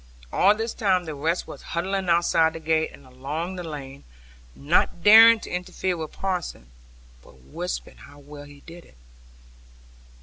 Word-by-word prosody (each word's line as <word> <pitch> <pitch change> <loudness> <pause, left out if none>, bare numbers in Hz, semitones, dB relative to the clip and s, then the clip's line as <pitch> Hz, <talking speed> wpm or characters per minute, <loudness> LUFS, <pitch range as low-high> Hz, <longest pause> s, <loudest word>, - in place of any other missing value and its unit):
All 205 +2 +4
this 225 +1 -4
time 185 -4 0
the 155 - -6
rest 160 +5 -2
were - - -10
huddling 185 +2 -3
outside 170 -1 +2
the 165 - -7
gate, 160 0 0
and 140 - -16
along 145 +8 -6
the 180 - -6
lane, 140 -4 -9 0.5
not 165 +3 0
daring 225 +2 +8
to - - -9
interfere 180 0 -3
with 160 -2 -6
parson, 180 - -5 0.5
but 65 +1 -20
whispering 175 +4 -6
how 145 0 -16
well 145 0 -12
he 145 0 -16
did 170 +2 -13
it. - - -23
165 Hz, 160 wpm, -24 LUFS, 145-185 Hz, 0.5 s, daring